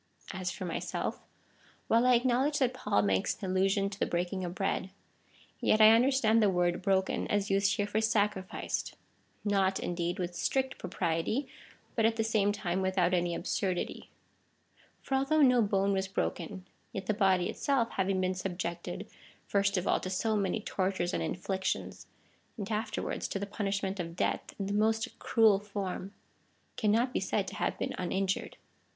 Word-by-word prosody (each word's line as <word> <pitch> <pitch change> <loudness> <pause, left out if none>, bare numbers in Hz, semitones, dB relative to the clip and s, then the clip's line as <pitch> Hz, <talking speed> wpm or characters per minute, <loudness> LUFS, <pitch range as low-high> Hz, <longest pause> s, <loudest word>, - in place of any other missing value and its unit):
As 185 -1 -3
for 185 +1 -5
myself 170 - -3 0.3
— - - -31
while 230 +2 +4
I 250 - +6
acknowledge 260 +4 +2
that 255 -2 +2
Paul 250 - +1
makes 95 -2 +1
an 190 -3 -4
allusion 195 +1 +2
to 200 0 -7
the - - +1
breaking 180 +2 -2
of 175 0 -4
bread, 195 -1 -1 0.7
yet 215 - +3
I 215 0 +9
understand 230 -1 +4
the 210 - +4
word 175 -1 +1
broken 190 0 +1
as 205 -1 0
used 195 0 +3
here 205 - 0
for 205 +1 0
sacrificed 205 -4 -1 0.3
— - - -37
not, 195 -2 +2
indeed, 175 +1 -2
with 175 -2 -3
strict 265 +8 -1
propriety, 165 - -1 0.5
but 225 - +2
at 225 - 0
the 225 - 0
same 215 -2 +2
time 190 -3 -2
without 185 -1 +1
any 175 -1 +1
absurdity. 185 -3 -2 0.9
For - - -4
although 275 +3 +3
no 250 -2 +5
bone 200 -1 +2
was 190 0 0
h'oken, 190 0 -3 0.3
yet 190 - -5
the 215 - +1
body 190 -4 +3
itself 270 -5 0
having 190 0 0
been 185 0 +1
subjected, 175 -2 -4 0.4
first 200 0 +1
of 180 - -1
all, - - +3
to 185 - -5
so 215 +4 0
many 200 +1 0
tortures 185 -3 -1
and - - 0
inflic 190 +1 -3
tions, - - -3 0.5
and 205 0 -5
afterwards 215 0 -2
to - - -3
the 200 - -3
punishment 200 -1 -2
of 170 -1 -4
death - - -2
in 195 - -3
the 200 - -2
most 220 +2 0
cruel 220 -4 +4
form, 200 -2 -5 0.6
cannot 230 +4 +2
be - - +1
said - - -1
to - - -9
have - - -1
been - - -2
uninjured. 190 +1 -1
195 Hz, 175 wpm, -31 LUFS, 185-220 Hz, 0.9 s, I